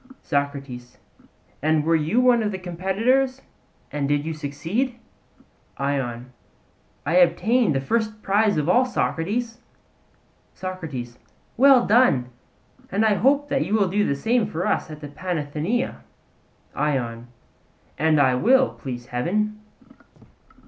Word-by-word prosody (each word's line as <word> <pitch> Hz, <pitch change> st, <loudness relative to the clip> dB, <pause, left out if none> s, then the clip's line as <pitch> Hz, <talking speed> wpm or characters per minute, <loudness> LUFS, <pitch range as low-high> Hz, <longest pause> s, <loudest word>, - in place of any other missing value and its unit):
SOCRATES: 140 Hz, -5 st, -3 dB, 0.6 s
And 155 Hz, +1 st, +2 dB
were 165 Hz, +2 st, +2 dB
you 160 Hz, +9 st, +1 dB
one 250 Hz, -2 st, +4 dB
of 210 Hz, -1 st, -1 dB
the 190 Hz, -, -4 dB
competitors 215 Hz, +10 st, 0 dB, 0.5 s
and 145 Hz, -1 st, -2 dB
did 145 Hz, 0 st, +1 dB
you 160 Hz, -, -3 dB
succeed? 165 Hz, -, -3 dB, 0.8 s
ION: 130 Hz, -3 st, -3 dB, 0.7 s
I 160 Hz, +5 st, +2 dB
obtained 200 Hz, -, +3 dB
the 135 Hz, -, 0 dB
first 215 Hz, +6 st, -2 dB
prize 205 Hz, -1 st, +2 dB
of 150 Hz, 0 st, 0 dB
all, 240 Hz, +9 st, +4 dB
Socrates. 230 Hz, 0 st, -2 dB, 1.0 s
SOCRATES: 150 Hz, -11 st, -6 dB, 0.4 s
Well 265 Hz, -1 st, +6 dB
done; 200 Hz, -, +3 dB, 0.6 s
and 205 Hz, +4 st, +2 dB
I 215 Hz, -, +4 dB
hope 275 Hz, +9 st, +2 dB
that 270 Hz, 0 st, +1 dB
you 215 Hz, -, -1 dB
will 200 Hz, -4 st, +2 dB
do 205 Hz, +3 st, +1 dB
the 140 Hz, -, 0 dB
same 225 Hz, -, +1 dB
for 170 Hz, +3 st, -3 dB
us -, -, 0 dB
at 155 Hz, -1 st, -9 dB
the 145 Hz, -, -6 dB
Panathenaea. 160 Hz, -, -3 dB, 0.8 s
ION: 120 Hz, -5 st, -2 dB, 0.7 s
And 155 Hz, 0 st, +2 dB
I 130 Hz, -2 st, +4 dB
will, 260 Hz, -, +4 dB
please 120 Hz, -3 st, -7 dB
heaven. 210 Hz, +13 st, -2 dB
175 Hz, 130 wpm, -23 LUFS, 145-225 Hz, 1.0 s, Well